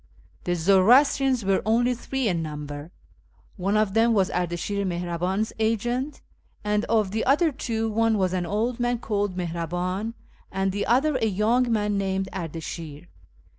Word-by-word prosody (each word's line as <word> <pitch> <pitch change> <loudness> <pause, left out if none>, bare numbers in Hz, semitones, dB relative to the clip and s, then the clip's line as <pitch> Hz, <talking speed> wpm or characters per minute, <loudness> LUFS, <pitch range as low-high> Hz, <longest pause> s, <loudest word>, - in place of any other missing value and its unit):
The 175 - +1
Zoroastrians 240 - +4
were 195 0 +2
only 235 +4 +2
three 260 +1 -2
in 175 -4 0
number: 150 -1 -6 0.7
one 195 +3 0
of 215 -2 +1
them 225 +1 +3
was 195 -3 +2
Ardashir 180 +3 -2
Mihraban's 180 +3 -2
agent, 240 +6 -1 0.4
and 210 0 0
of 215 -4 +1
the 220 +2 -1
other 300 +5 +3
two 225 -4 -2
one 225 0 +2
was 185 -2 +1
an 180 -2 -1
old 230 +6 -1
man 245 0 +1
called 205 -4 -2
JMihraban, 180 +5 -3 0.4
and 195 0 0
the 205 +2 -2
other 270 +4 +3
a 225 -3 +1
young 225 +5 +2
man 210 -2 +1
named 190 0 -1
Ardashir. 165 -2 -6
205 Hz, 150 wpm, -25 LUFS, 180-230 Hz, 0.7 s, Zoroastrians